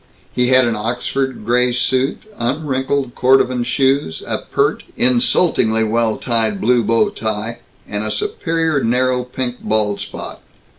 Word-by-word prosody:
He 125 -1 +2
had 130 0 +5
an 115 -1 0
Oxford 125 +2 -3
gray 125 +1 +2
suit, 130 +2 0 0.2
unwrinkled 130 0 -1
cordovan 130 -1 +2
shoes; 135 - 0
a - - -2
pert, - - -1 0.2
insultingly 120 -2 +3
well 110 0 0
tied 110 -4 0
blue 120 +3 +2
bow 115 0 +2
tie, 110 +1 -4 0.3
and 105 0 -3
a 110 - -1
superior 160 +6 -1
narrow 125 +2 +1
pink 125 0 -4
bald 105 -2 0
spot. - - -7
125 Hz, 135 wpm, -18 LUFS, 110-130 Hz, 0.3 s, had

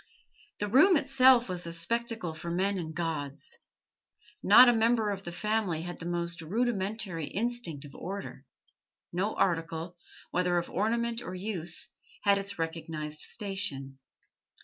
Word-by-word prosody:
The 205 - -2
room 305 - +6
itself 260 -3 +5
was 180 -2 -2
a - - -4
spectacle 220 +1 -1
for 170 +2 -6
men 190 +3 0
and 160 -2 -6
gods. 165 - -3 0.8
Not 250 - +9
a 240 - +6
member 225 -1 +2
of 195 -1 -4
the 175 - -6
family 210 -4 -1
had 175 0 -6
the 165 - -5
most 170 -1 -2
rudimentary 195 -3 -1
instinct 220 -10 -2
of 140 - -12
order; 195 +3 -7 0.7
no 195 +5 -1
article, 165 0 -1 0.3
whether 180 0 +1
of 170 - -2
ornament 235 +3 0
or 185 -6 -6
use, 180 -4 -2 0.3
had 200 -1 +4
its 200 0 -4
recognised 160 -2 -4
station. 150 -12 -3
185 Hz, 140 wpm, -30 LUFS, 165-225 Hz, 0.8 s, Not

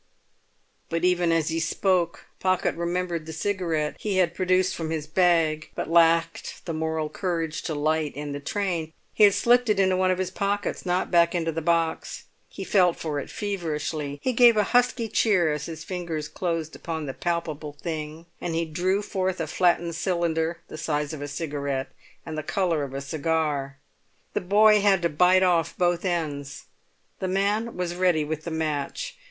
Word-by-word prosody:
But 165 +1 0
even 175 -2 +3
as 165 -1 +1
he 165 0 -1
spoke 175 0 0
Pocket 185 -1 +1
remembered 170 -1 -2
the - - -5
cigarette 165 -4 -1
he 205 -3 -1
had 175 -2 +3
produced 185 +1 +2
from 160 -1 -4
his 160 -2 -2
bag, 160 -2 +2
but - - -4
lacked 165 0 +2
the 170 - -3
moral 160 0 -1
courage 165 -2 -2
to 160 - -3
light, 155 0 0
in 145 0 -5
the 140 - -4
train. 170 -1 -2 0.2
He 215 - +6
had 200 - +4
slipped 245 0 +3
it 210 -2 +2
into 190 -1 +3
one 185 0 +2
of 185 - +2
his 185 -1 -2
pockets, 200 0 -2
not 180 +1 0
back 170 0 +4
into 165 -1 0
the 165 +1 -3
box. 165 0 0 0.3
He 195 - -7
felt 180 -3 +3
for 150 -3 -3
it - - -7
feverishly. 155 -7 -3
He 255 - +1
gave 235 -1 +6
a 210 - +4
husky 245 -1 +3
cheer 185 -8 +2
as 150 0 -4
his 160 -1 -7
fingers 170 -4 -4
closed 165 -2 -3
upon 160 -2 -4
the 135 - -4
palpable 160 -3 -3
thing, 155 +1 -6 0.2
and 170 -2 -2
he 165 0 0
drew 185 +6 0
forth 190 -2 -2
a 165 - -1
flattened 170 +1 +1
cylinder 170 -2 -1
the 155 - -8
size 150 0 -1
of 150 - -6
a 145 - -4
cigarette 140 -2 -3 0.3
and 160 - -5
the 155 - -2
colour 170 0 0
of 135 -1 -5
a 135 - -3
cigar. 145 -2 -1 0.6
The - - 0
boy 210 +3 +5
had 195 -3 +3
to 170 - +3
bite 180 +4 +4
off 175 -3 +2
both 175 -1 +1
ends; 145 -6 -3 0.5
the 190 - -2
man 200 +4 0
was 180 -1 -2
ready 175 -3 +2
with 155 +1 -4
the - - -3
match. 160 - -3
170 Hz, 185 wpm, -25 LUFS, 155-185 Hz, 0.6 s, He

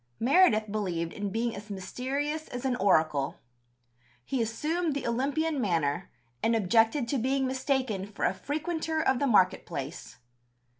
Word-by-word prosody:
Meredith 230 - +4
believed 175 -6 -2
in 205 -1 -3
being 230 +3 -1
as 205 +2 -9
mysterious 270 +10 -3
as 245 +1 -6
an 260 -1 +1
oracle. 155 - +2 0.9
He 265 - -1
assumed 300 +8 -1
the 280 - -3
Olympian 280 +5 0
manner, 170 -4 0 0.3
and 230 +1 +2
objected 225 +5 +3
to 275 - +1
being 265 +3 +1
mistaken 260 -6 -1
for 205 - -3
a 180 - +2
frequenter 315 - -2
of 265 -5 +2
the 280 - +1
market 190 -6 +4
place. 145 -2 -7
235 Hz, 145 wpm, -29 LUFS, 200-280 Hz, 0.9 s, Meredith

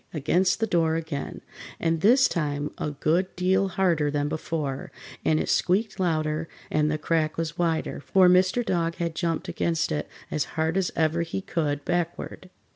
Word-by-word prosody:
against 180 +7 +2
the 225 - +2
door 165 -5 +2
again, 160 -3 -4 0.4
and 165 -1 0
this 250 +7 +6
time 145 -2 -2
a - - -1
good 160 +5 +1
deal 190 +2 +2
harder 175 -6 +1
than 145 0 0
before, 150 -3 -3 0.3
and 155 0 +2
it - - -2
squeaked 195 +2 +1
louder 155 -2 0 0.2
and 150 0 +2
the 155 - 0
crack 155 0 0
was 165 -1 -2
wider, 165 -2 0
for 185 +5 +4
Mr. 185 +6 +4
Dog 170 -4 0
had 170 -1 -2
jumped 165 -1 -2
against 165 -1 -1
it 150 - -2 0.2
as 155 - 0
hard 160 +1 +1
as 190 -3 +1
ever 160 +1 +1
he 170 +3 -3
could, 150 -6 -2
backward. 175 +1 -3
165 Hz, 170 wpm, -26 LUFS, 155-180 Hz, 0.4 s, this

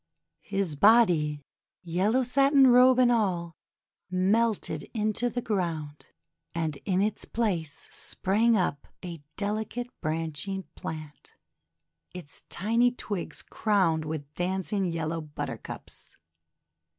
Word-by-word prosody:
His 195 -6 -2
body, 160 -7 +4 0.4
yellow 195 +9 +1
satin 275 +2 +5
robe 250 0 +7
and 250 -1 +5
all, 180 -7 0 0.6
melted 190 -3 +1
into 215 +2 0
the 245 +1 -3
ground, 165 -8 -3 0.5
and 160 -4 -2
in 190 -1 +2
its 215 0 -1
place 180 -10 -2
sprang 220 +4 +1
up 175 -6 -1 0.2
a 170 -4 -7 0.2
delicate 220 +4 -2
branching 165 +5 -2
plant, 155 -3 -8 0.8
its 175 -6 -8
tiny 230 +6 +2
twigs 205 -6 -5
crowned 185 -7 +1
with 150 -2 -5
dancing 190 +3 -1
yellow 165 -1 -2
Buttercups. 150 -1 -7
190 Hz, 100 wpm, -28 LUFS, 160-225 Hz, 0.8 s, robe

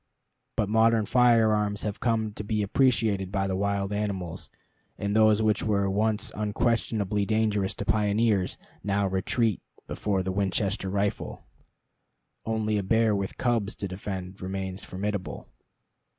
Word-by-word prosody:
But 110 -3 +1
modern 110 +1 +3
firearms 110 -4 +3
have 105 -2 -3
come 110 -3 0
to 105 - -6
be 105 0 0
appreciated 105 -4 +2
by 95 -1 0
the 95 -1 -1
wild 100 0 -1
animals; 100 -5 -3 0.5
and 100 0 -2
those 110 0 +5
which 110 -1 +2
were 100 -2 +1
once 105 +1 0
unquestionably 105 -1 0
dangerous 105 -2 0
to 100 - -5
pioneers, 105 -2 +1 0.3
now 100 +1 +1
retreat 95 +3 0 0.2
before 100 -3 -1
the 95 - -2
Winchester 95 0 -1
rifle. 100 +1 -2 1.0
Only 110 -1 0
a - - -2
bear 110 +2 +3
with 100 -1 -3
cubs 115 -5 0
to 100 - -4
defend 95 0 -6
remains 95 0 -4
formidable. 100 0 -4
105 Hz, 135 wpm, -27 LUFS, 95-110 Hz, 1.0 s, those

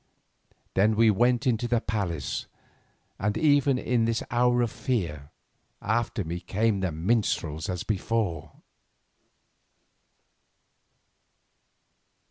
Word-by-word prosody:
Then 105 +3 +3
we 115 0 +5
went 120 +5 +2
into 120 -1 +1
the 120 -1 +2
palace, 95 -10 -3 0.7
and 105 +2 0
even 145 -3 +3
in 120 -2 +1
this 115 0 0
hour 125 0 +3
of 115 - -1
fear, 85 - -3 0.5
after 115 0 -1
me 85 +1 -4
came 100 +4 0
the 95 -2 -1
minstrels 80 -3 -1
as 90 -2 -3
before. 95 -7 -2
110 Hz, 100 wpm, -27 LUFS, 90-120 Hz, 0.7 s, we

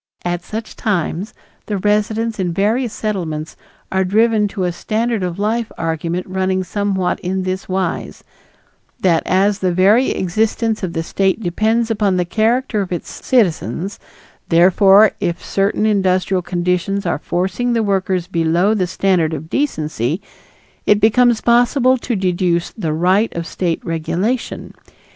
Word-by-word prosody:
At 175 0 -2
such 220 +3 -6
time 185 -2 -1 0.4
the 210 - -1
residents 215 +2 0
in 180 -2 0
various 220 +6 0
Settlements 165 -9 -4 0.4
are 190 0 +2
driven 215 +2 +2
to 195 -1 -4
a 180 - 0
standard 220 +5 -1
of 180 -1 -3
life 220 +3 -1
argument 165 +2 -2
running 190 0 -1
somewhat 195 -2 -1
in 185 +1 -2
this 185 +1 -4
wise 185 -2 -3 0.8
that 170 -4 +3
as 195 +2 +2
the 185 -2 +1
very 200 +8 +4
existence 220 +4 0
of 180 -4 -3
the 165 - -2
State 190 +4 0
depends 220 +6 +1
upon 205 -4 +1
the 180 - +1
character 225 +3 +1
of 190 - -5
its 175 - -4
citizens, 195 -4 0 0.5
therefore 190 +4 +6
if 170 0 -3
certain 200 +2 0
industrial 190 -2 +1
conditions 180 +3 -1
are 170 - -1
forcing 190 +10 -1
the 230 -1 +1
workers 190 -3 0
below 175 +3 +1
the 190 -4 0
standard 175 -3 +1
of 155 +2 -8
decency, 155 - -1 0.7
it 205 - +5
becomes 225 +2 +4
possible 245 +2 +3
to 235 0 -2
deduce 180 -2 0
the 165 -8 -3
right 185 +7 +2
of 170 0 -3
State 170 0 -2
regulation. 180 +9 -2
190 Hz, 145 wpm, -18 LUFS, 175-215 Hz, 0.8 s, therefore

